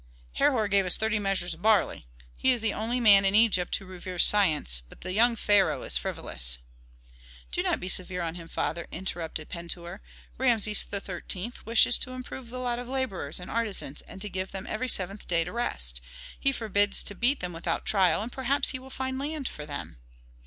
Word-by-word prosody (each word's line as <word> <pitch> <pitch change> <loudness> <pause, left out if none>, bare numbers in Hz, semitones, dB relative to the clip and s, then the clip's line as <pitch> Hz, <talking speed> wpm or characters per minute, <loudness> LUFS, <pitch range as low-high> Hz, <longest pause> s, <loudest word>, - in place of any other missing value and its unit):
"Herhor 235 -7 +2
gave 200 0 +3
us 180 - +3
thirty 220 0 0
measures 195 -3 0
of 160 - -13
barley. 210 - +1 0.3
He 260 - +2
is 245 -3 0
the 220 -2 0
only 230 +3 -2
man 205 -4 +7
in 195 +1 +3
Egypt 210 -5 +3
who 195 - -6
reveres 185 -1 +3
science, 155 - +5
but - - -16
the 185 +1 -4
young 235 +3 +5
pharaoh 205 -3 +2
is - - +5
frivolous." - - -1 0.9
"Do - - 0
not - - 0
be 180 - -6
severe 180 -1 +1
on 165 -1 -3
him, 170 -1 -9
father," 170 +1 -3
interrupted 165 -4 -5
Pentuer. 170 +2 -6 0.4
"Rameses 225 -5 +4
XIII. 195 +2 -4
wishes 230 +1 +4
to 255 - -4
improve 255 -1 -8
the 255 - -7
lot 245 -1 -2
of 245 - -7
laborers 225 - -3
and 180 - -9
artisans, 215 -11 -2
and - - -11
give 190 -2 -4
them 190 -1 -5
every 255 +4 -3
seventh 195 0 0
day 170 -1 +2
to 175 - -7
rest; 60 - -2 0.4
he 275 - +2
forbids 205 -5 +1
to - - -4
beat 245 +8 +1
them 180 -1 -4
without 165 - -3
trial, 190 -2 +2
and 235 - -6
perhaps 265 +2 0
he 260 - -3
will 260 +1 -13
find 260 0 -4
land 290 -1 -4
for 150 0 -8
them." 145 - -7
200 Hz, 195 wpm, -27 LUFS, 175-235 Hz, 0.9 s, man